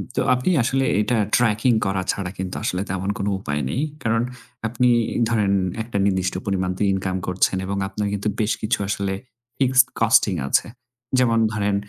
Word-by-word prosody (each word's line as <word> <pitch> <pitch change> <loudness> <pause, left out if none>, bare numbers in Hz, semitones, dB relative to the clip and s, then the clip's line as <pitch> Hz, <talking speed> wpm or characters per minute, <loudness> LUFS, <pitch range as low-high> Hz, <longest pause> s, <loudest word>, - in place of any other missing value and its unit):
তো - - +1
আপনি 125 +7 0
আসলে 135 +2 +1 0.2
এটা 115 +3 +1 0.2
ট্র্যাকিং 115 +1 +3
করা 95 0 0
ছাড়া 95 -2 -4
কিন্তু 95 -1 -4
আসলে 90 +1 -1
তেমন 95 +1 -2
কোন 100 - -2
উপায় 75 -5 -2
নেই। 130 - -1 0.2
কারণ 115 0 +2 0.5
আপনি 125 +2 +2 0.4
ধরেন 105 -4 +2 0.3
একটা 110 -2 -4
নির্দিষ্ট 95 -2 +1
পরিমাণ 95 -2 0
তো - - -8
ইনকাম 95 -1 -2
করছেন 90 +1 +1
এবং 100 +1 -3
আপনার 105 +1 -3
কিন্তু 100 +1 -2
বেশ 110 -1 +1
কিছু 110 +2 0
আসলে 100 -1 -1 0.4
ফিক্সড 130 -1 +4
কস্টিং 110 -4 +4
আছে। - - +2 0.5
যেমন 115 -3 +3
ধরেন 100 -2 0
105 Hz, 165 wpm, -22 LUFS, 95-115 Hz, 0.5 s, ফিক্সড